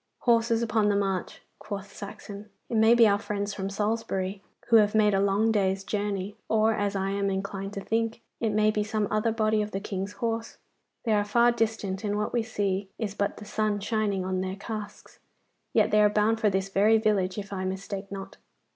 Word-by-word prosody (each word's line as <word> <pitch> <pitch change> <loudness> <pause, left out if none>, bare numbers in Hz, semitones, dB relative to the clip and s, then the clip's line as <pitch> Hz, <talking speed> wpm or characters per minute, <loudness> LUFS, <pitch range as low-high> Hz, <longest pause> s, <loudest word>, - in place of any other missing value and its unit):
'Horse 235 -1 +3
upon 215 -2 +2
the 205 - +2
march,' 195 -2 -2 0.2
quoth 200 -1 -7
Saxon. 205 0 -9 0.2
'It 235 - -2
may 220 +1 +6
be 235 -2 +7
our 200 0 +3
friends 205 0 -3
of 195 +1 -2
Salisbury, 200 -2 -2 0.3
who 230 - +8
have 210 -1 +3
made 210 -1 +4
a 195 - +3
long 200 +3 +2
day's 195 -2 +1
journey; 200 -1 -2
or, 220 0 +3
as 205 -1 -1
I 195 0 -1
am 200 0 0
inclined 195 +1 -4
to 200 - -4
think, 225 +2 -1 0.2
it 225 - +1
may 215 0 +3
be 210 0 0
some 215 -1 -1
other 215 +2 +1
body 215 -1 +1
of 210 - -2
the 195 - -3
King's 195 0 -4
horse. 230 +1 -3 0.5
They 225 - +1
are 205 -1 +3
far 235 +3 +4
distant, 220 -4 -2
and 205 -1 -1
what 210 - -2
we 240 - +2
see 200 -3 -2
is 210 -4 -3
but 200 0 -2
the 210 - -9
sun 210 0 0
shining 205 -2 -1
on 185 0 -1
their 190 0 -3
casques; 210 0 -8 0.5
yet 215 -1 +3
they 210 0 +5
are 210 - +6
bound 215 +2 +2
for 215 - +3
this 190 0 -1
very 210 +3 +4
village, 205 -4 +1
if 200 -1 -5
I 190 -1 -3
mistake 195 +1 -4
not. 195 0 -7
205 Hz, 210 wpm, -27 LUFS, 195-220 Hz, 0.5 s, who